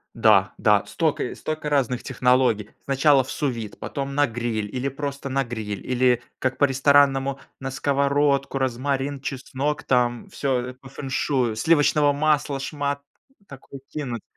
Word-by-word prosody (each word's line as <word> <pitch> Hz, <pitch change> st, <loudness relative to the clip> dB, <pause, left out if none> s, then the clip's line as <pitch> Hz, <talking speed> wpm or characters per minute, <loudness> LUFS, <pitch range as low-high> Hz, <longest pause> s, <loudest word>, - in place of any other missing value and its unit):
Да, -, -, +4 dB
да. -, -, +3 dB
Стока -, -, 0 dB
стока 155 Hz, -1 st, -4 dB
разных 130 Hz, -4 st, +1 dB
технологий: 125 Hz, -4 st, +2 dB
сначала 135 Hz, 0 st, +4 dB
в -, -, -12 dB
су-вид, 115 Hz, -8 st, -3 dB
потом 140 Hz, 0 st, -4 dB
на 145 Hz, 0 st, +4 dB
гриль, 115 Hz, -3 st, -3 dB
или 130 Hz, +2 st, -1 dB
просто 140 Hz, 0 st, -5 dB
на 135 Hz, +1 st, +1 dB
гриль, 110 Hz, -4 st, -5 dB
или 125 Hz, -1 st, +2 dB, 0.2 s
как 130 Hz, 0 st, -1 dB
по-ресторанному, 135 Hz, 0 st, +3 dB, 0.2 s
на 135 Hz, -, -4 dB
сковородку, 140 Hz, 0 st, +1 dB
розмарин, 135 Hz, +2 st, -1 dB
чеснок 140 Hz, +1 st, -3 dB
там, 120 Hz, -2 st, +1 dB
всё, 135 Hz, -3 st, -1 dB
э, 125 Hz, -, -8 dB
по 130 Hz, +1 st, -15 dB
феншую, 130 Hz, -3 st, -1 dB
сливочного 145 Hz, +3 st, +3 dB
масла 145 Hz, -1 st, +1 dB
шмат 140 Hz, 0 st, -3 dB, 0.5 s
такой 135 Hz, 0 st, -11 dB
кинуть. 125 Hz, -7 st, -4 dB
135 Hz, 140 wpm, -24 LUFS, 125-140 Hz, 0.5 s, Да